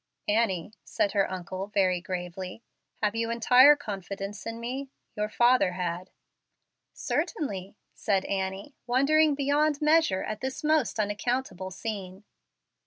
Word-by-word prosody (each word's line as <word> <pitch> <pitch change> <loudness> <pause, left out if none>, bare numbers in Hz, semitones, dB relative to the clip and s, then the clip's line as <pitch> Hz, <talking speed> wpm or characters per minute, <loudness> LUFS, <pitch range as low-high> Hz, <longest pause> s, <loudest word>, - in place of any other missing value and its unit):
"Annie," 210 -3 0
said 200 - 0
her 195 -1 +1
uncle, 185 +1 -5
very 185 -3 +1
gravely, 180 +3 -6 0.4
"have 210 -1 +2
you 230 0 -1
entire 250 +5 +7
confidence 200 -4 -6
in 230 0 -5
me? 260 +4 -4 0.3
Your 210 0 -2
father 240 -5 +3
had." 180 0 -3 0.8
"Certainly," 200 - -3 0.2
said 195 -2 0
Annie, 195 +6 -3
wondering 290 +4 +4
beyond 290 +1 +1
measure 305 -10 +3
at 215 - -5
this 265 +4 -4
most 305 -7 +1
unaccountable 210 -2 -2
scene. 190 -1 -6
210 Hz, 120 wpm, -28 LUFS, 190-260 Hz, 0.8 s, entire